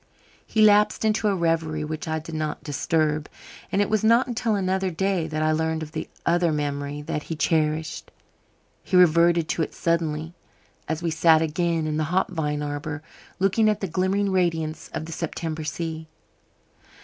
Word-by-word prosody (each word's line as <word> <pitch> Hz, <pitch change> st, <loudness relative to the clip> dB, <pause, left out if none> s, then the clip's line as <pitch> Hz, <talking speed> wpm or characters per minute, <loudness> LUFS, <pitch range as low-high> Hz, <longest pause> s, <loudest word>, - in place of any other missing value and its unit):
He 215 Hz, -, +3 dB
lapsed 210 Hz, +1 st, +4 dB
into 215 Hz, 0 st, +2 dB
a 200 Hz, -, +2 dB
reverie 165 Hz, -3 st, 0 dB
which 155 Hz, +1 st, -5 dB
I 160 Hz, 0 st, -1 dB
did 160 Hz, +1 st, -8 dB
not 155 Hz, -1 st, -3 dB
disturb, 155 Hz, +1 st, 0 dB, 0.4 s
and 200 Hz, -, +3 dB
it -, -, -2 dB
was 215 Hz, -1 st, 0 dB
not 230 Hz, +3 st, +5 dB
until 235 Hz, -3 st, -1 dB
another 190 Hz, -1 st, 0 dB
day 185 Hz, -1 st, 0 dB
that 155 Hz, -1 st, -2 dB
I 155 Hz, -, +2 dB
learned 160 Hz, 0 st, 0 dB
of 155 Hz, -, -9 dB
the -, -, -5 dB, 0.2 s
other 175 Hz, -1 st, +2 dB
memory 145 Hz, -1 st, -3 dB
that 150 Hz, -, -3 dB
he 165 Hz, -, -2 dB
cherished. 155 Hz, 0 st, 0 dB, 0.7 s
He 185 Hz, -, +1 dB
reverted 170 Hz, -1 st, +5 dB
to -, -, 0 dB
it 160 Hz, -, -3 dB
suddenly 165 Hz, -1 st, -1 dB, 0.5 s
as 160 Hz, +2 st, -3 dB
we 165 Hz, -, 0 dB
sat 160 Hz, 0 st, +4 dB
again 165 Hz, 0 st, 0 dB
in 155 Hz, -1 st, -1 dB
the 155 Hz, -, 0 dB
hop 180 Hz, +4 st, 0 dB
vine 150 Hz, -4 st, -2 dB
arbour, 145 Hz, +1 st, -4 dB, 0.3 s
looking 200 Hz, +3 st, +3 dB
at 210 Hz, -1 st, 0 dB
the 195 Hz, -, -2 dB
glimmering 190 Hz, +3 st, 0 dB
radiance 165 Hz, -4 st, -1 dB
of -, -, -4 dB
the 165 Hz, -, -8 dB
September 160 Hz, -1 st, -4 dB
sea. 160 Hz, 0 st, -4 dB
160 Hz, 175 wpm, -24 LUFS, 155-185 Hz, 0.7 s, not